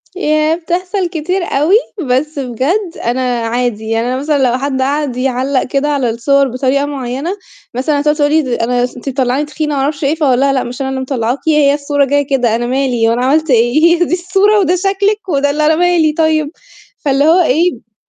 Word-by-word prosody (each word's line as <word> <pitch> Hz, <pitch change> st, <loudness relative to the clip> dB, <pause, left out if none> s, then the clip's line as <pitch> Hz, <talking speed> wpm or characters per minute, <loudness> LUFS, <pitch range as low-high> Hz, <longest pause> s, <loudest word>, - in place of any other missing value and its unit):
ياه، 310 Hz, -2 st, +1 dB
بتحصل 360 Hz, +3 st, -2 dB
كتير 355 Hz, +3 st, -2 dB
أوي، 315 Hz, +4 st, +1 dB, 0.3 s
بس 285 Hz, +4 st, 0 dB
بجد 280 Hz, -, -2 dB
أنا 240 Hz, +2 st, 0 dB, 0.3 s
عادي، 230 Hz, -2 st, -2 dB
يعني 225 Hz, +1 st, 0 dB
أنا 255 Hz, +1 st, -1 dB
مثلًا 290 Hz, +2 st, 0 dB
لو 250 Hz, -, 0 dB
حد 265 Hz, 0 st, -2 dB
قعد 280 Hz, -1 st, -1 dB
يعلّق 260 Hz, +1 st, 0 dB
كده 275 Hz, +3 st, -1 dB
على 275 Hz, -5 st, 0 dB
الصور 275 Hz, +5 st, +1 dB
بطريقة 265 Hz, +3 st, 0 dB
معينة، 275 Hz, +2 st, -4 dB, 0.4 s
مثلًا 285 Hz, +4 st, 0 dB
تقعد 300 Hz, +1 st, +1 dB
تقول 290 Hz, -1 st, +1 dB
لي 295 Hz, -6 st, +1 dB
أنا 245 Hz, +1 st, 0 dB
أنتِ 250 Hz, +2 st, -5 dB
مطلّعاني 265 Hz, +2 st, 0 dB
تخينة، 300 Hz, 0 st, -3 dB
ما 275 Hz, -, 0 dB
أعرفش 285 Hz, +2 st, -2 dB
ايه. 280 Hz, +3 st, +1 dB
فاقول 275 Hz, -6 st, +1 dB
لها: 275 Hz, 0 st, +2 dB
"لأ 260 Hz, -, 0 dB
مش 245 Hz, +3 st, -7 dB
أنا 265 Hz, -, -2 dB
اللي 265 Hz, 0 st, -3 dB
مطلعاكِ، 255 Hz, -1 st, -2 dB
هي 300 Hz, -2 st, +4 dB
الصورة 285 Hz, -1 st, 0 dB
جاية 285 Hz, +1 st, 0 dB
كده 250 Hz, -5 st, +1 dB
أنا 240 Hz, +1 st, -2 dB
مالي؟ 250 Hz, -3 st, 0 dB
وأنا 240 Hz, +2 st, 0 dB
عملت 310 Hz, +4 st, +1 dB
إيه؟ 240 Hz, +6 st, +3 dB, 0.2 s
هي -, -, +4 dB
دي 345 Hz, -, -3 dB
الصورة 385 Hz, +4 st, +2 dB
وده 365 Hz, -2 st, +2 dB
شكلِك 395 Hz, +2 st, -1 dB
وده 285 Hz, -3 st, +1 dB
اللي 300 Hz, +2 st, 0 dB
أنا 315 Hz, +1 st, +3 dB
مالي 340 Hz, -2 st, +2 dB
طيب؟" 315 Hz, -2 st, +1 dB, 0.5 s
فاللي 280 Hz, 0 st, +1 dB
هو 335 Hz, +4 st, +5 dB
إيه 285 Hz, -, 0 dB
280 Hz, 200 wpm, -14 LUFS, 255-315 Hz, 0.5 s, هو